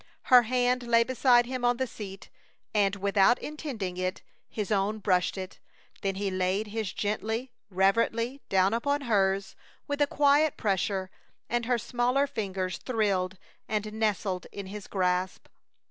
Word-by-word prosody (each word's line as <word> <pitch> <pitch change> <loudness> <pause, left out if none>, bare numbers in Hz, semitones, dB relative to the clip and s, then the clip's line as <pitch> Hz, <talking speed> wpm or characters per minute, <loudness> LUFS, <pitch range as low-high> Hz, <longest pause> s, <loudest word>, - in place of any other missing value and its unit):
Her 250 - +11
hand 250 +1 +1
lay 230 0 +5
beside 245 -1 +4
him 255 0 -4
on 245 0 +3
the 260 - 0
seat, 195 -5 -9 0.4
and 200 -2 +2
without 200 +3 +3
intending 250 - -5
it 185 +2 -3 0.3
his 210 -1 -4
own 205 +1 +1
brushed 185 -2 +1
it. 185 0 -7 0.4
Then 195 -1 -1
he 195 0 -2
laid 185 +3 0
his 215 -2 -3
gently, 220 +4 -2 0.2
reverently, 230 +7 +1
down 190 +1 +3
upon 285 +5 0
hers 195 -5 +1 0.3
with 285 0 -2
a 290 - +5
quiet 290 +1 +3
pressure, 190 -2 -1 0.4
and 240 -1 0
her 245 -1 +2
smaller 245 +4 +1
fingers 190 -8 -3
thrilled 195 -6 0 0.3
and 215 0 -2
nestled 205 -4 -1
in 200 - -6
his 200 +1 -8
grasp. 185 -1 -1
210 Hz, 145 wpm, -28 LUFS, 195-245 Hz, 0.4 s, Her